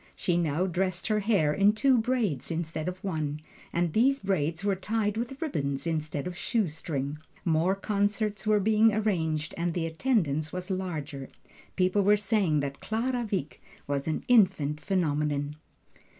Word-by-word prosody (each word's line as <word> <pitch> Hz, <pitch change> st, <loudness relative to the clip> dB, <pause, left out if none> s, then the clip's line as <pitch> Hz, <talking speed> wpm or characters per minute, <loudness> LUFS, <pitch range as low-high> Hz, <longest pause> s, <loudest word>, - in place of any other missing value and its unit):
She 175 Hz, -, 0 dB
now 170 Hz, 0 st, +1 dB
dressed 185 Hz, 0 st, -1 dB
her 215 Hz, -1 st, +2 dB
hair 195 Hz, -8 st, +2 dB
in 200 Hz, +5 st, +4 dB
two 260 Hz, +4 st, +3 dB
braids 220 Hz, -, 0 dB
instead 165 Hz, -1 st, -3 dB
of 180 Hz, 0 st, -3 dB
one, 155 Hz, -6 st, -2 dB, 0.3 s
and 170 Hz, -2 st, 0 dB
these 270 Hz, +5 st, +3 dB
braids 170 Hz, -3 st, -1 dB
were 200 Hz, -1 st, +2 dB
tied 210 Hz, +2 st, -1 dB
with 240 Hz, +4 st, -4 dB
ribbons 140 Hz, -, -2 dB
instead 155 Hz, -3 st, -2 dB
of 180 Hz, -, -4 dB
a -, -, -16 dB
shoe 205 Hz, +1 st, 0 dB
string. 150 Hz, -2 st, -4 dB, 0.3 s
More 170 Hz, +3 st, +2 dB
concerts 205 Hz, +1 st, -1 dB
were 215 Hz, -1 st, +4 dB
being 215 Hz, +1 st, +4 dB
arranged, 160 Hz, -8 st, 0 dB
and 170 Hz, 0 st, -1 dB
the 170 Hz, -2 st, 0 dB
attendance 160 Hz, -, 0 dB
was 180 Hz, +2 st, -5 dB
larger 155 Hz, -8 st, -4 dB, 0.5 s
people 185 Hz, +2 st, +2 dB
were 205 Hz, +2 st, +5 dB
saying 195 Hz, -7 st, +1 dB
that 140 Hz, -1 st, -4 dB
Clara 240 Hz, +2 st, -1 dB
Wieck 180 Hz, -8 st, -3 dB, 0.2 s
was 140 Hz, 0 st, -2 dB
an 155 Hz, -, -1 dB
Infant 185 Hz, -, +4 dB
Phenomenon. 150 Hz, -4 st, 0 dB
180 Hz, 160 wpm, -28 LUFS, 155-210 Hz, 0.5 s, were